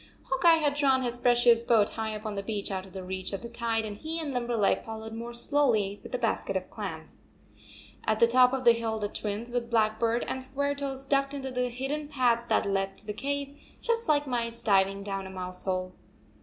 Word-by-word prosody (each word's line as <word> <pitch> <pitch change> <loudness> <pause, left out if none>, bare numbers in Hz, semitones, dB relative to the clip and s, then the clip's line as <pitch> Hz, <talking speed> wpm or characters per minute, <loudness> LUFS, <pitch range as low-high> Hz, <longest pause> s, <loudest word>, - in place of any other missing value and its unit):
Hawk 265 - -2
Eye 335 -1 +9
had 300 -3 +1
drawn 270 -3 +3
his 245 0 -2
precious 240 -1 +5
boat 225 -3 +4
high 220 -1 -3
up 215 +1 -8
on 215 - -2
the 200 - -3
beach 205 -1 -4
out 190 0 -3
of 190 - -16
reach 185 +1 -4
of 195 - -4
the 235 - -6
tide, 230 -1 -1
and 205 -1 -6
he 320 +6 -3
and 300 -4 -3
Limberleg 240 -4 +1
followed 220 0 -7
more 235 +1 -6
slowly 235 -6 +2
with - - -11
the - - 0
basket - - 0
of - - -7
clams. - - -7 0.8
At 220 0 +1
the - - +7
top 250 +1 +5
of 265 -1 -2
the 240 - +8
hill, 230 -1 -1
the 205 -1 -2
Twins, 215 +3 -4
with 240 -1 -2
Blackbird 230 +1 +2
and 260 - -3
Squaretoes, 275 0 -3
ducked 275 0 +1
into 270 -1 -4
the 250 0 0
hidden 270 +5 -3
path 245 -5 +2
that - - +3
led 195 -1 -1
to - - -12
the 210 - -3
cave, 280 +3 -3 0.2
just 465 -3 -1
like 295 -1 +3
mice 235 -3 -2
diving 195 -1 +3
down 195 -1 -4
a - - -8
mouse 185 -1 -7
hole. 185 -1 -1
235 Hz, 220 wpm, -29 LUFS, 210-265 Hz, 0.8 s, Eye